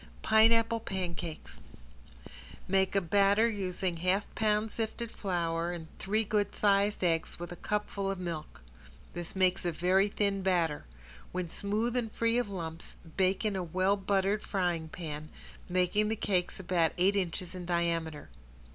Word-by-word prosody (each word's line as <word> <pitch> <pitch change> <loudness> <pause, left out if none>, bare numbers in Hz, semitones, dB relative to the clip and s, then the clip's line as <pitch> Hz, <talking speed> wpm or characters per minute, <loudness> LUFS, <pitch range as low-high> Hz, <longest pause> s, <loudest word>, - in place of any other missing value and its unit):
~PINEAPPLE 230 +1 +5
PANCAKES~ 175 -6 -5 1.1
Make 190 +1 +2
a 195 - +4
batter 200 +5 +4
using 185 -4 -2
half 185 +4 +1
pound 215 0 +1
sifted 230 +1 -3
flour 170 -3 -1
and 170 -2 -6
three 215 +3 +1
good 205 -1 0
sized 200 -1 +2
eggs 165 -2 0
with 175 +1 -7
a - - -5
cupful 205 0 -2
of 195 - -2
milk. 170 - -6 0.5
This 175 +4 -5
makes 185 0 +2
a 175 - 0
very 185 +4 +3
thin 200 -1 0
batter. 175 -5 +1 0.5
When 180 -2 -3
smooth 215 +4 0
and 235 -3 -1
free 230 +2 +1
from 240 - -6
lumps, 165 -3 -6 0.2
bake 190 +3 +2
in 210 -2 +1
a 190 - -1
well 185 +3 +1
buttered 200 +1 +1
frying 175 -5 -1
pan, 155 -2 -6 0.4
making 185 +4 +2
the 220 - 0
cakes 185 -4 -1
about 175 -3 +1
eight 190 +3 +3
inches 185 -1 -2
in 180 -2 -7
diameter. 170 -3 -1
190 Hz, 150 wpm, -31 LUFS, 175-205 Hz, 1.1 s, ~PINEAPPLE